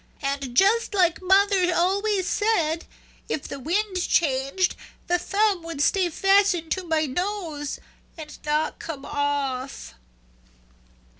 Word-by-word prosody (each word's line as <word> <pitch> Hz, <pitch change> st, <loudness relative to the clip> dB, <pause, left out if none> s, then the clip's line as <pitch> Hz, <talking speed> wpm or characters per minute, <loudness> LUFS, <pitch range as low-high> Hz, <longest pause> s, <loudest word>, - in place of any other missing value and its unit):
And 275 Hz, -3 st, -3 dB
just 425 Hz, +2 st, +3 dB
like 355 Hz, -3 st, +2 dB
mother 380 Hz, -1 st, +3 dB
always 390 Hz, +2 st, +1 dB
said, 340 Hz, -7 st, 0 dB, 0.4 s
if 290 Hz, -, -3 dB
the 280 Hz, -, -7 dB
wind 370 Hz, -, -1 dB
changed 280 Hz, +3 st, +1 dB, 0.3 s
the 355 Hz, 0 st, +1 dB
thumb 400 Hz, 0 st, +1 dB
would 330 Hz, -3 st, -7 dB
stay 360 Hz, +5 st, +2 dB
fastened 390 Hz, -2 st, +2 dB
to 375 Hz, -, -1 dB
my 320 Hz, -2 st, 0 dB
nose 325 Hz, -2 st, -3 dB, 0.4 s
and 305 Hz, -2 st, -9 dB
not 300 Hz, +1 st, -1 dB
come 285 Hz, -4 st, -7 dB
off." 280 Hz, -2 st, -3 dB
345 Hz, 120 wpm, -24 LUFS, 290-390 Hz, 0.4 s, just